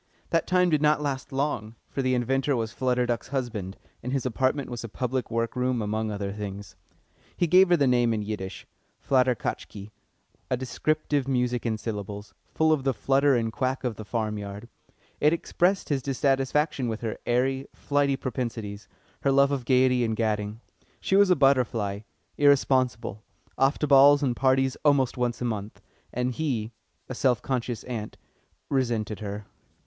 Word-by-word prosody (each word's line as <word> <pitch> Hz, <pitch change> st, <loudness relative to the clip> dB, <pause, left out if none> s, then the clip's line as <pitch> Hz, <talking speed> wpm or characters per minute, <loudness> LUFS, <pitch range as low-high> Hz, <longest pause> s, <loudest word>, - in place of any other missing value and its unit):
That 165 Hz, -1 st, +1 dB
time 180 Hz, -1 st, +3 dB
did 155 Hz, -2 st, +2 dB
not 150 Hz, 0 st, +4 dB
last 140 Hz, -1 st, -3 dB
long, 135 Hz, -5 st, -2 dB
for 135 Hz, -, -3 dB
the 130 Hz, -1 st, +1 dB
inventor 135 Hz, +3 st, +1 dB
was 115 Hz, -2 st, -2 dB
Flutter 125 Hz, 0 st, 0 dB
Duck's 120 Hz, -1 st, -2 dB
husband, 115 Hz, -8 st, -4 dB, 0.2 s
and 125 Hz, -, -4 dB
his 135 Hz, -1 st, -1 dB
apartment 130 Hz, +3 st, 0 dB
was 120 Hz, -2 st, -6 dB
a 115 Hz, -, -6 dB
public 125 Hz, +3 st, -2 dB
work 115 Hz, +1 st, -1 dB
room 125 Hz, -1 st, 0 dB
among 110 Hz, +1 st, -2 dB
other 100 Hz, -1 st, -3 dB
things. 100 Hz, -1 st, -7 dB, 0.6 s
He 175 Hz, -, +2 dB
gave 185 Hz, +2 st, +6 dB
her 175 Hz, -, +5 dB
the 145 Hz, -, +3 dB
name 120 Hz, -2 st, +3 dB
in 110 Hz, -2 st, -1 dB
Yiddish 100 Hz, -3 st, -5 dB, 0.3 s
Flatterkatchki 125 Hz, -5 st, -1 dB, 0.6 s
a 125 Hz, -, +1 dB
descriptive 145 Hz, +2 st, -1 dB
music 125 Hz, -2 st, 0 dB
in 110 Hz, -1 st, 0 dB
syllables, 105 Hz, -1 st, -6 dB, 0.2 s
full 160 Hz, 0 st, +2 dB
of 145 Hz, -4 st, -1 dB
the 135 Hz, -2 st, 0 dB
flutter 135 Hz, +3 st, +3 dB
and 115 Hz, -2 st, -1 dB
quack 130 Hz, +2 st, -1 dB
of 125 Hz, -3 st, -2 dB
the 110 Hz, -, -6 dB
farm 110 Hz, -1 st, -2 dB
yard. 100 Hz, +2 st, -7 dB, 0.5 s
It 150 Hz, +2 st, +4 dB
expressed 180 Hz, +3 st, 0 dB
his 140 Hz, -3 st, 0 dB
dissatisfaction 135 Hz, +1 st, 0 dB
with 110 Hz, -1 st, -3 dB
her 110 Hz, -2 st, -4 dB
airy, 130 Hz, +2 st, +1 dB
flighty 140 Hz, -1 st, +1 dB
propensities, 115 Hz, -6 st, -4 dB, 0.3 s
her 140 Hz, -, +2 dB
love 140 Hz, +1 st, +4 dB
of 135 Hz, -4 st, -2 dB
gaiety 125 Hz, -1 st, +3 dB
and 110 Hz, -1 st, 0 dB
gadding. 105 Hz, 0 st, -2 dB, 0.4 s
She 190 Hz, -, 0 dB
was 200 Hz, -1 st, +6 dB
a 180 Hz, -, +5 dB
butterfly, 125 Hz, -8 st, +2 dB, 0.4 s
irresponsible, 130 Hz, -6 st, +2 dB, 0.3 s
off 135 Hz, +2 st, +2 dB
to -, -, 0 dB
balls 145 Hz, +1 st, +6 dB
and 125 Hz, -3 st, +1 dB
parties 130 Hz, +1 st, +2 dB
almost 140 Hz, -4 st, +3 dB
once 125 Hz, -1 st, -2 dB
a -, -, -1 dB
month, 105 Hz, -3 st, -4 dB, 0.3 s
and 125 Hz, +1 st, -1 dB
he, 120 Hz, -6 st, -2 dB, 0.4 s
a -, -, -5 dB
self 125 Hz, -2 st, +1 dB
conscious 125 Hz, -3 st, -2 dB
ant, 110 Hz, -4 st, -6 dB, 0.5 s
resented 115 Hz, -6 st, -1 dB
her. 105 Hz, 0 st, -6 dB
125 Hz, 170 wpm, -26 LUFS, 110-140 Hz, 0.6 s, gave